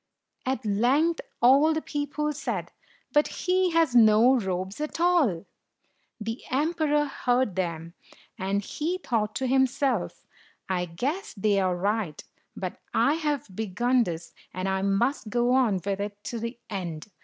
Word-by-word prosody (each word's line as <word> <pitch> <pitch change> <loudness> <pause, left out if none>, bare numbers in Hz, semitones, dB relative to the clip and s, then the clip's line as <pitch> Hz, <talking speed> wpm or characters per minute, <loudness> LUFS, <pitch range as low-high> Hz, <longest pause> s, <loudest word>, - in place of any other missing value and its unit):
At 260 -2 -1
length 260 +11 +2 0.2
all 280 +6 +6
the 315 - -1
people 295 +1 -2
said, - - -4 0.4
"But 295 0 +4 0.2
he 370 0 +3
has 330 -6 +2
no 225 +2 +6
robe 190 -4 -2
at 305 +2 -4
all! 315 - +2 0.4
" - - -42 0.3
The 225 +2 -4
emperor 295 +1 +1
heard 250 -6 0
them, 170 -2 -3 0.4
and 195 +2 -1
he 330 - -2
thought 220 - -1
to 265 - -1
himself, 265 +1 +1 0.2
" - - -32
I 180 -2 0
guess 275 - -3
they 205 0 +2
are 185 -2 +1
right, 200 -4 -1 0.3
but - - -5 0.2
I 285 - +4
have 295 - -2
begun 240 +5 +1
this, 170 -2 -6 0.2
and 185 +1 -2
I 190 0 0
must 215 +5 0
go 240 +2 +2
on 250 -6 +3
with 195 +2 -2
it 205 0 -5
to 235 - -4
the 230 +2 -5
end." 180 -3 -5
240 Hz, 155 wpm, -27 LUFS, 195-290 Hz, 0.4 s, all